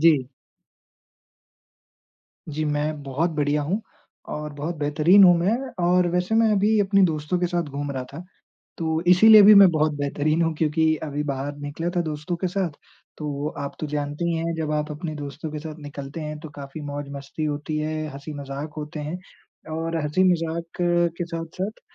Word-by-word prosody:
जी। 145 -6 +4 2.2
जी, 155 +1 -2
मैं 150 0 -1
बहुत 140 +5 -1
बढ़िया 150 -1 0
हूँ, 180 +9 -1 0.5
और 150 0 -5
बहुत 150 +4 -4
बेहतरीन 150 +6 +5
हूँ 175 -1 +8
मैं 185 +6 +2 0.3
और 180 +1 +4
वैसे 180 +4 0
मैं 225 0 +4
अभी 210 +2 +3
अपने 195 0 +3
दोस्तों 155 0 0
के 175 - +1
साथ 175 0 0
घूम 140 +1 -4
रहा 130 -2 -4
था। 155 +5 -7 0.6
तो 160 -1 0
इसीलिए 210 +4 +8
भी 210 +1 +9
मैं 200 -1 +9
बहुत 155 -1 +1
बेहतरीन 145 +3 0
हूँ, 165 0 +1
क्योंकि 160 0 +2
अभी 150 -1 -3
बाहर 140 0 -3
निकला 145 +4 -3
था - - +3
दोस्तों 155 +2 -4
के 185 - -2
साथ। 185 -1 -1 0.5
तो 145 -1 -3
आप 140 -1 -4
तो 155 - -2
जानते 145 +2 -3
ही 170 0 +1
हैं 165 +1 -2
जब 155 -1 -2
आप 150 0 -1
अपने 155 +1 -5
दोस्तों 150 +2 -6
के 155 - -4
साथ 155 0 -7
निकलते 145 +1 -7
हैं 150 0 -5
तो 160 - -8
काफ़ी 140 +1 -9
मौज-मस्ती 145 0 -5
होती 150 +1 -3
है, 155 0 -2
हँसी-मज़ाक 140 +1 -6
होते 150 0 -5
हैं, 150 +4 -4 0.5
और 165 +1 -2
हँसी-मज़ाक 165 +1 +1 0.5
के 175 - -1
साथ-साथ 170 +5 -5
155 Hz, 170 wpm, -24 LUFS, 145-170 Hz, 2.2 s, भी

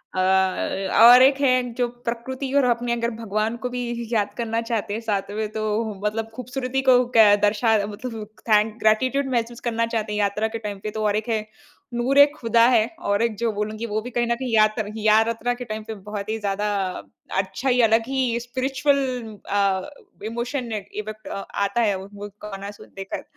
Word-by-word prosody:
अ, - - 0
और 190 +5 +5
एक 270 +1 +4
है 255 -2 +4
जो 245 0 0 0.2
प्रकृति 260 +3 -4
और 280 - +4
अपने 235 0 -1
अगर 235 0 -1
भगवान 215 +2 -1
को - - 0
भी 240 -1 -4
याद 205 -2 0
करना 230 -1 -1
चाहते 225 -3 -2
हैं 225 - -3
साथ 200 -3 -2
में। 215 +1 -2
तो 215 0 -2
मतलब 225 +1 -1
खूबसूरती 255 +2 -3
को 250 - +7 0.2
क 210 -2 +8
दर्शा 220 +2 +3
मतलब 215 0 -7 0.2
थैंक 215 +1 +3
ग्रैटिट्यूड 255 +6 +2
महसूस 235 0 -1
करना 230 0 0
चाहते 225 -2 -3
हैं। 210 - -1
यात्रा 205 +2 +1
के 230 +1 -5
टाइम 205 -2 -6
पे 215 - -3
तो 220 0 -3
और 205 - +2
एक 215 +2 -2
है 220 -2 0 0.5
नूर 245 +3 0
ए 285 - +11
खुदा 230 -4 +3
है। 225 -3 +4 0.2
और 200 +1 +2
एक 230 -2 0
जो 230 +1 0
बोलूँगी 215 +2 -3
वो 215 -1 -2
भी 245 - -7
कहीं 240 0 0
न 235 - +1
कहीं 250 -1 -4
यात्र 215 0 +2
यात्रा 225 +3 +2
के 245 0 -7
टाइम 215 -1 -5
पे 220 0 -6
बहुत 205 +1 -7
ही 220 - -1
ज़्यादा 205 0 -1 0.7
अच्छा 190 +8 -3
ही 250 -1 +4
अलग 225 0 +4
ही 260 -3 0
स्पिरिचुअल 260 +3 0 0.5
अ, 195 +3 +1 0.4
इमोशन 235 +2 -3
इफेक्ट 215 +1 -6
अ, - - -5 0.2
आता 200 +4 0
है 205 -3 +2
वो 190 - -9
वो 205 0 -7 0.2
गाना 200 -1 -6
सुन 205 - -14
देकर। 195 0 -6
225 Hz, 195 wpm, -23 LUFS, 210-240 Hz, 0.7 s, ए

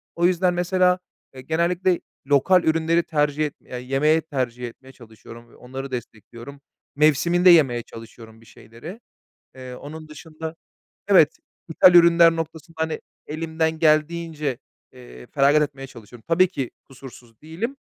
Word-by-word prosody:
O 170 - +1
yüzden 180 0 +2
mesela, 180 +1 +1 0.3
eee, 130 - -10
genellikle 170 +5 0 0.3
lokal 170 +6 +3
ürünleri 165 +1 +1
tercih 150 -1 0
et 145 - -5
eee, - - -10
yemeye 135 +6 +1
tercih 125 -5 -4
etmeye 130 +3 -14
çalışıyorum 115 -1 -15
ve - - -20
onları 135 +2 -8
destekliyorum. 120 +3 -9 0.3
Mevsiminde 155 +5 +3
yemeye 135 -9 +5
çalışıyorum 115 0 -14
bir - - -20
şeyleri. 120 - -12 0.6
Eee, 130 -1 -9
onun 155 +4 -10
dışında 160 +1 -9 0.5
evet, 170 -6 +4 0.3
ithal 175 +2 +5
ürünler 170 -1 +6
noktasında, 165 +1 -7
hani, 160 -1 -3 0.3
elimden 160 +1 -2
geldiğince, 155 -3 0 0.4
eee, 60 0 -14
feragat 145 +2 +3
etmeye 135 -2 -4
çalışıyorum. 115 -1 -15
Tabii 175 +3 +4
ki 140 -9 -5
kusursuz 125 -4 -15
değilim 175 - -5
155 Hz, 135 wpm, -22 LUFS, 130-165 Hz, 0.6 s, ürünler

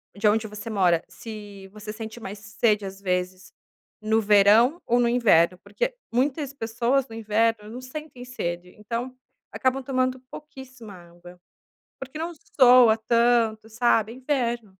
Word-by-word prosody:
de 210 +1 +1
onde 220 +1 +2
você 210 +2 -8
mora, 180 -5 +2
se 205 -3 -10
você 210 +1 -9
sente 220 +1 -8
mais 205 -1 -8
sede 210 0 0
às 195 0 -8
vezes 185 0 -3 0.5
no 220 +1 +1
verão 210 - +4
ou 240 +1 +2
no 240 - +3
inverno. 185 -8 +3
Porque - - -3 0.2
muitas 275 +2 0
pessoas 245 +2 -1
no 225 - -10
inverno 220 0 0
não 245 +3 -8
sentem 255 -1 -9
sede, 175 -8 -5
então 235 +4 -5 0.4
acabam 260 0 0
tomando 255 -1 -1
pouquíssima 260 -7 -11
água. 175 0 -15 0.6
Porque 270 +3 -8
não 335 +2 -4 0.3
sua 245 -3 +7
tanto, 230 -1 +1
sabe, 225 -1 +1
é - - -10
inverno. 240 -5 -2
225 Hz, 145 wpm, -24 LUFS, 205-255 Hz, 0.6 s, sua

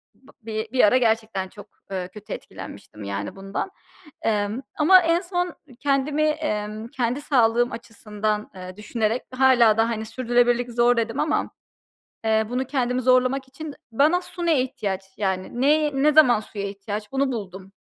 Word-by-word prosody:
bı 270 +1 -21
bi 220 0 -4
bir 260 - +3
ara 210 +5 +6
gerçekten 220 -5 0
çok, 205 +2 -13 0.2
ııı, 185 -2 -3
kötü 210 +1 -9
etkilenmiştim 105 - -10
yani 100 0 -4
bundan. 195 - -4 0.5
Emm, 210 +2 0 0.2
ama 370 +5 +7
en 335 0 +2
son 355 -2 -2 0.2
kendimi, 285 +1 +1
emm, 220 -9 -1
kendi 245 +2 -2
sağlığım 240 -4 +3
açısından, 215 -2 -4
eee, 185 0 -9
düşünerek 220 +2 -1
hâlâ 250 -4 +5
da, 225 +1 +3
hani, 220 -1 -3
sürdürülebilirlik 245 +1 +1
zor 240 +1 +3
dedim 230 +2 -1
ama. 305 - 0 0.8
Eee, 220 0 +3
bunu 250 +2 -1
kendimi 255 -2 0
zorlamak 255 +1 +2
için 290 +3 -8 0.2
bana 300 +9 +3
su 355 -1 -6
ne 320 -6 +3
ihtiyaç, 200 -7 -3 0.2
yani, 190 +4 -2
ne, 300 +2 +3
ne 300 0 +5
zaman 260 -7 +6
suya 205 -2 -6
ihtiyaç 205 +1 -6
bunu 270 0 +1
buldum. 195 -4 -7
235 Hz, 155 wpm, -24 LUFS, 210-270 Hz, 0.8 s, ama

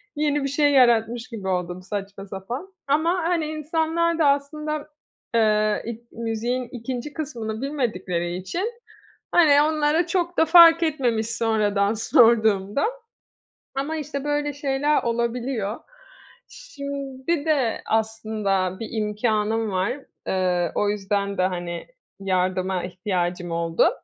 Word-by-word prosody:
yeni 295 -1 +1
bir - - 0
şey 290 +1 +3
yaratmış 240 -2 +3
gibi 205 -5 -6
oldum, 180 -1 -2
saçma 195 0 -6
sapan. 240 - -6
Ama, 315 +4 +2 0.2
hani, 340 -3 +1
insanlar 320 +2 0
da 315 - +4
aslında, 300 +2 -1 0.5
eee, 215 -1 +3
ik 235 0 -8
müziğin 235 +2 -2
2'nci 250 +4 -5
kısmını 230 -8 -5
bilmedikleri 190 - -2
için, 190 - -3 0.6
hani, 295 -4 +6
onlara 310 +2 +2
çok 350 0 -1
da 320 - +5
fark 335 0 +8
etmemiş, 250 -8 0
sonradan 215 -3 +1
sorduğumda, 220 - +3 0.9
ama 280 +4 -2
işte 285 -2 -4
böyle 290 0 -1
şeyler 285 +1 +1
olabiliyor. 235 -2 -2 0.7
Şimdi 280 +2 -4
de 275 -8 +1
aslında 215 -4 -1
bir 225 - -4
imkânım 215 0 0
var, 190 +4 0 0.4
ııı, 180 -2 +1
o 205 - +1
yüzden 200 0 -1
de, 185 - +2
hani, 175 -2 -3 0.3
yardıma 185 -1 0
ihtiyacım 180 -1 -2
oldu. 165 0 +2
230 Hz, 115 wpm, -24 LUFS, 200-290 Hz, 0.9 s, fark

